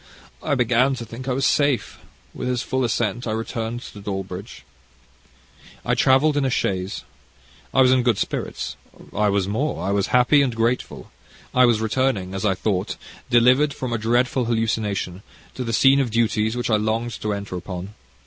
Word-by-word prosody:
I 145 - 0
began 125 +2 +2
to 120 - -6
think 125 +3 -9
I 130 - +1
was 135 +2 0
safe. 140 -7 +1 0.3
With 125 - -5
his 125 0 -1
full 130 -1 -1
assent 120 0 -1
I 110 - -1
returned 115 +1 -4
to 105 - -10
Dawlbridge. 95 0 -6 1.2
"I - - +1
travelled 140 +3 +4
in 145 - +1
a 135 - +1
chaise. 95 -3 -2 0.7
I 135 - +4
was 130 - +5
in 130 -1 +4
good 120 -4 +2
spirits. - - -3 0.4
I 105 0 +2
was 100 -1 +1
more 110 - -2
I 100 - 0
was 100 -1 +1
happy 125 +4 +4
and 130 -4 0
grateful. 115 +2 -2 0.4
I 125 0 +6
was 115 -3 +2
returning, 110 -5 0
as 95 +2 -3
I 95 -2 +2
thought, 95 -1 -1 0.3
delivered 130 +5 +4
from 125 -2 -4
a 115 - -1
dreadful 120 +3 +1
hallucination, 110 -5 -1 0.3
to 130 - -4
the 115 - -3
scene 135 +4 +5
of 135 -3 +1
duties 110 0 +1
which 120 -1 -1
I 110 - +4
longed 110 +2 -2
to 105 - -1
enter 100 -2 -4
upon. 90 +2 -6
115 Hz, 180 wpm, -22 LUFS, 105-130 Hz, 1.2 s, I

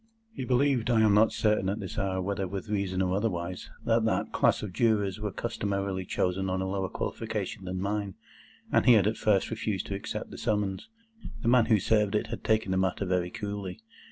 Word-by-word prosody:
He 135 - -5
believed—I 125 -3 +2
am 110 -2 +5
not 105 +2 +5
certain 105 -3 +1
at 100 - -2
this 95 0 -5
hour 95 -2 -1
whether 95 0 -2
with 100 +3 -6
reason 95 -2 0
or 90 0 0
otherwise—that 90 -4 -1
that - - 0
class - - +2
of 100 -4 -5
Jurors 105 -3 +1
were 105 -1 -3
customarily 100 -1 -2
chosen 95 +2 -1
on 95 0 -1
a 95 - -1
lower 95 0 -2
qualification 105 -3 -4
than 90 0 -3
mine, 100 0 -2 0.6
and - - +3
he 125 - +9
had 105 -4 +5
at 110 +2 +1
first 105 -1 +2
refused 105 -3 -2
to - - -4
accept 100 - -5
the - - -8
summons. 105 - -1 0.5
The 115 - +2
man 120 -2 +5
who 110 -3 +4
served 105 +1 +2
it 110 +2 0
had 115 - -5
taken 110 -3 +1
the 95 - +1
matter 95 +1 0
very 90 -1 0
coolly. 100 +1 -5
100 Hz, 200 wpm, -28 LUFS, 95-110 Hz, 0.6 s, he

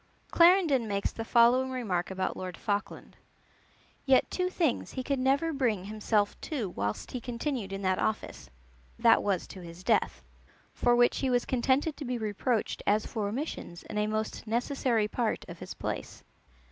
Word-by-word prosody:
Clarendon 335 - +5
makes 200 -1 -1
the 225 - -5
following 240 +3 +4
remark 210 -9 -2
about 190 0 -2
Lord 185 -2 -6
Falkland: 205 0 -3 0.9
"Yet 265 -2 +3
two 365 0 0
things 335 -7 -1
he 260 - -3
could 275 0 -1
never 280 +5 +2
bring 235 -9 0
himself 210 0 0
to 255 - -3
whilst 100 - -3
he 250 - -4
continued 245 -3 -3
in 195 0 -5
that 185 0 +1
office, 215 - -3 0.5
that 230 -1 +5
was 195 -4 0
to 190 - -10
his 170 +1 -10
death; - - +1 0.5
for 240 0 +3
which 240 0 +3
he 265 - 0
was 245 -1 +2
contented 265 +4 +1
to 290 - -6
be 250 0 -2
reproached 220 +1 -1
as 210 +1 +3
for 215 -3 -3
omissions 215 - -5
in 210 - -4
a 210 - +1
most 215 +1 -3
necessary 235 -1 +1
part 225 +1 -2
of - - -9
his - - -7
place. - - -5
235 Hz, 170 wpm, -29 LUFS, 205-260 Hz, 0.9 s, Clarendon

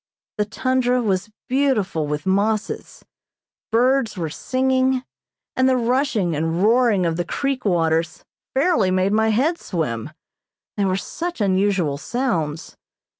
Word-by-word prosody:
The 210 - +2
tundra 250 +3 +1
was 195 -3 -1 0.2
beautiful 230 - +1
with 150 +2 -3
mosses, 205 +3 -1 0.7
birds 240 -2 +2
were 165 -3 -3
singing, 260 +4 +1 0.5
and 260 0 +3
the 260 - +3
rushing 235 - +1
and 165 +4 -1
roaring 225 -4 +3
of 165 -1 0
the 175 - 0
creek 275 +5 -2
waters 165 -3 0 0.3
fairly 265 - +3
made 185 +1 +1
my 220 +1 +3
head 280 +11 +1
swim, 150 - -3 0.7
they 205 - 0
were 185 -1 +1
such 340 - -5
unusual 190 -7 +1
sounds. 170 - -2
210 Hz, 125 wpm, -21 LUFS, 175-255 Hz, 0.7 s, and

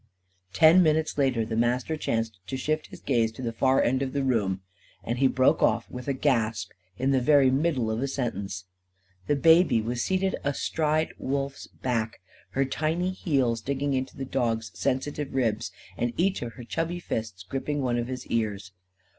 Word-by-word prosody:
Ten 160 - +7
minutes 155 -1 +2
later 130 -5 +2
the 110 - -3
Master 125 +6 +1
chanced 115 -8 -2
to 130 - -3
shift 155 +3 -1
his - - -12
gaze 115 -4 +1
to 130 - -8
the 115 -1 -2
far 130 +3 +3
end 130 +2 +1
of 130 -1 -2
the 140 -1 0
room. 105 -8 0 0.4
And 120 +4 -2
he 135 - +5
broke 130 0 +3
off, 115 +1 +2
with 125 +1 -7
a 140 - +1
gasp, 115 -5 0 0.3
in 130 +2 +1
the 130 -1 +3
very 140 -1 +5
middle 135 -5 +1
of 110 +2 -2
a 140 - 0
sentence. 100 -8 -3 0.6
The 145 - +3
baby 165 -3 +5
was 120 +2 -2
seated 190 0 0
astride 155 +2 0
Wolf's 135 0 -3
back, 115 -3 -2 0.3
her 135 +1 +2
tiny 160 +6 -1
heels 135 -11 0
digging 140 +3 -1
into 130 0 -2
the 135 - -4
dog's 115 -5 -1
sensitive 135 - -2
ribs, 115 -5 0 0.3
and 120 0 -1
each 190 +3 +1
of 120 -1 -5
her 125 - -10
chubby 165 +8 -2
fists 110 - -4
gripping 140 +5 -2
one 120 -1 +1
of 120 - -2
his 130 -1 -5
ears. 100 -5 -2
130 Hz, 180 wpm, -27 LUFS, 115-145 Hz, 0.6 s, Ten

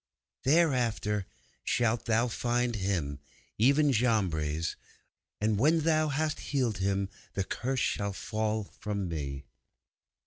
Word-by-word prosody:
'Thereafter 125 - +2 0.4
shalt 120 -1 +1
thou 115 +2 +2
find 120 0 0
Him, 90 -8 -1 0.4
even 140 +5 +5
Jambres. 85 - +1 0.6
And 105 -1 +1
when 160 +6 +4
thou 155 0 +3
hast 155 +2 -1
healed 125 -8 -1
him 100 0 +1 0.3
the 95 - 0
Curse 130 +6 -2
shall 100 -1 0
fall 110 +1 -1
from 100 -1 -4
me! 70 -4 -4
110 Hz, 110 wpm, -30 LUFS, 100-130 Hz, 0.6 s, even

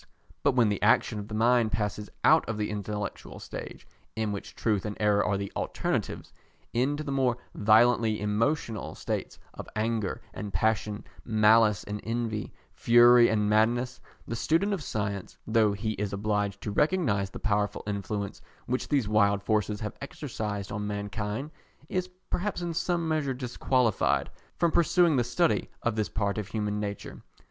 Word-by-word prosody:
But 140 - +2
when 120 -4 +4
the 105 - -2
action 105 - +3
of 105 - -7
the 105 - -5
mind 115 0 +3
passes 105 -1 -2
out - - +6
of 110 - -2
the 105 0 -2
intellectual 105 -1 -5
stage, - - -8 0.3
in 110 -1 -1
which 100 - -6
truth 105 -4 0
and 105 -1 -5
error 105 -1 +3
are 100 -1 0
the 100 0 -4
alternatives, - - -2 0.4
into 140 +5 0
the 140 - -4
more 130 -3 +1 0.2
violently 110 +1 +4
emotional 110 +2 -1
states - - -4 0.2
of - - -9
anger 110 -1 -1
and 105 -1 -6
passion, 105 +2 0 0.2
malice 110 -2 +4
and 105 0 -5
envy, 115 -2 -2 0.2
fury 120 0 +6
and 105 -1 +1
madness; 120 +4 +2 0.3
the 115 - -3
student 165 - +1
of 190 - -2
science, 100 -6 -4
though 110 -2 +3
he 110 +2 -2
is 105 -2 -3
obliged 105 -1 -1
to 105 - -4
recognise 130 - +1
the - - -8
powerful 105 -2 -1
influence 100 0 -4 0.2
which 125 +1 -2
these 140 -7 +1
wild 100 -1 +3
forces 105 0 0
have 105 -1 -4
exercised 110 -8 -5
on 105 0 -3
mankind, 105 +6 -4 0.4
is 185 -1 -1 0.2
perhaps 190 -1 -1
in 170 -1 -2
some 170 0 0
measure 150 -4 0
disqualified 125 -3 +1 0.3
from 170 -1 +2
pursuing 170 -1 +4
the 125 - +3
study 140 +8 +1
of 120 -2 0
this 110 -1 -1
part 100 -1 -1
of 105 - -5
human 105 -1 -2
nature. 100 -1 -5
110 Hz, 160 wpm, -28 LUFS, 105-125 Hz, 0.4 s, out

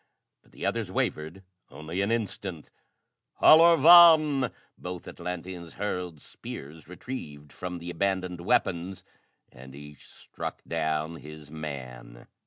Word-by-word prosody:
But - - -28
the - - -7
others - - -2
wavered 80 +5 -3 0.3
only 80 +5 -5
an 100 - 0
instant. 100 -7 -4 0.7
"Halor 165 +1 +7
vàn!" 155 -5 +7 0.2
Both 90 -1 -8
Atlanteans 90 -1 -7
hurled 90 -5 -4
spears 75 +2 -10
retrieved 75 - -9
from 90 -1 -6
the 85 +1 -7
abandoned 90 -1 -2
weapons 90 +1 -1 0.5
and 65 +2 -13
each 75 0 -13
struck - - -8
down 80 0 -2
his 75 -1 -12
man. 65 -6 -8
85 Hz, 115 wpm, -27 LUFS, 75-95 Hz, 0.7 s, Halor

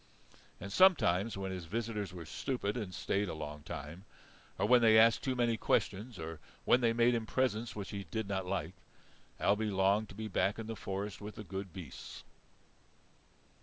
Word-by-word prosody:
And 100 +2 -7
sometimes 115 - +4
when 95 -1 -3
his 90 -2 -5
visitors 105 +1 -3
were 90 -2 -8
stupid 115 - -2
and 105 -6 -4
stayed 100 +1 -1
a - - -4
long 75 -1 -6
time, 80 +2 -7 0.5
or - - +1
when 125 +1 +6
they 110 -1 +6
asked 115 0 +6
too 130 -2 0
many 120 -2 +2
questions, 110 +3 0
or 80 0 -6 0.3
when 125 - +5
they 115 -1 +4
made 120 +1 +4
him 115 -2 -1
presents 120 -2 0
which 100 -2 -5
he 100 -2 -5
did 110 +3 -2
not 95 -2 -2
like, 95 -1 -2 0.7
Ailbe 105 +2 +2
longed 100 +2 +2
to - - -11
be 110 +1 -4
back 100 0 +1
in 115 - -5
the 115 0 -5
forest 100 0 -4
with 105 +1 -7
the 110 - -7
good 95 -1 -6
beasts. 85 -8 -9
105 Hz, 185 wpm, -33 LUFS, 95-115 Hz, 0.7 s, when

